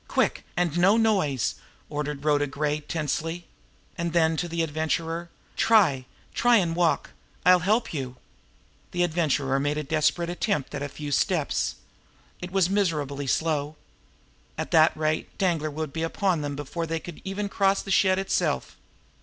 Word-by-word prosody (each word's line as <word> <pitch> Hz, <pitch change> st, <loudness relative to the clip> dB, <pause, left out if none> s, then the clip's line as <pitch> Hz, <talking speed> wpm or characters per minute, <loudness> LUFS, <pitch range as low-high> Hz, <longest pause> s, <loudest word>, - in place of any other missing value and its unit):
Quick! -, -, 0 dB
And 175 Hz, -1 st, +1 dB
no 195 Hz, +5 st, +5 dB
noise!"' 190 Hz, -, +2 dB, 0.3 s
ordered 150 Hz, -1 st, -4 dB
Rhoda 145 Hz, -1 st, +3 dB
Gray 150 Hz, +2 st, -1 dB
tersely. 165 Hz, +2 st, -3 dB, 0.5 s
And 170 Hz, -1 st, -2 dB
then 160 Hz, -1 st, +3 dB
to 175 Hz, -, -1 dB
the 170 Hz, 0 st, -1 dB
Adventurer: 160 Hz, +2 st, -2 dB, 0.3 s
"Try 165 Hz, -, +3 dB, 0.3 s
try 245 Hz, 0 st, +4 dB
and 175 Hz, -6 st, +2 dB
walk! 175 Hz, -2 st, +1 dB, 0.3 s
I'll 180 Hz, 0 st, +7 dB
help 210 Hz, +6 st, +1 dB
you." 130 Hz, -4 st, -4 dB, 0.8 s
The 175 Hz, 0 st, +2 dB
Adventurer 150 Hz, -5 st, +1 dB
made 145 Hz, +2 st, 0 dB
a 150 Hz, -, -2 dB
desperate 160 Hz, +3 st, +1 dB
attempt 175 Hz, -5 st, -1 dB
at -, -, -4 dB
a 145 Hz, -, -3 dB
few 145 Hz, +1 st, -6 dB
steps. -, -, +1 dB, 0.6 s
It 180 Hz, -, -6 dB
was 190 Hz, -1 st, +2 dB
miserably 150 Hz, -8 st, -1 dB
slow. 150 Hz, +1 st, 0 dB, 0.8 s
At -, -, -4 dB
that 160 Hz, 0 st, +5 dB
rate 155 Hz, 0 st, -1 dB
Danglar 165 Hz, -5 st, +1 dB
would 155 Hz, -1 st, -5 dB
be 160 Hz, -, -3 dB
upon 170 Hz, 0 st, 0 dB
them 145 Hz, -1 st, -3 dB
before 155 Hz, +4 st, -4 dB
they 165 Hz, 0 st, -2 dB
could 170 Hz, -1 st, -10 dB
even 200 Hz, +1 st, -3 dB
cross 195 Hz, 0 st, +1 dB
the 195 Hz, -, -5 dB
shed 190 Hz, 0 st, +4 dB
itself. 195 Hz, 0 st, -1 dB
165 Hz, 155 wpm, -26 LUFS, 150-180 Hz, 0.8 s, I'll